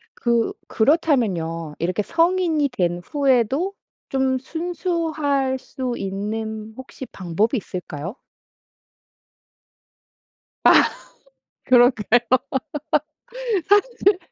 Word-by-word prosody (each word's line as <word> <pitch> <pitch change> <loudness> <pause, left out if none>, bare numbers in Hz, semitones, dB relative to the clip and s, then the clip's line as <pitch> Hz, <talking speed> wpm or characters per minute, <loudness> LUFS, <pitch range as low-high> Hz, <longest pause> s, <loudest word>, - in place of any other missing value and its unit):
그 235 -1 +1 0.2
그렇다면요. 205 - +1
이렇게 180 +5 -1
성인이 330 - +2
된 175 -8 -1
후에도 275 - +1 0.4
좀 265 -1 +1
순수할 315 -4 -1
수 255 -2 -4
있는 215 +2 -4
혹시 260 0 -9
방법이 200 - -1
있을까요? 180 - -6 2.5
아 - - +8 0.8
그럴까요? 245 -2 +5 1.5
사실 410 -1 +3
255 Hz, 165 characters per minute, -22 LUFS, 210-305 Hz, 2.5 s, 아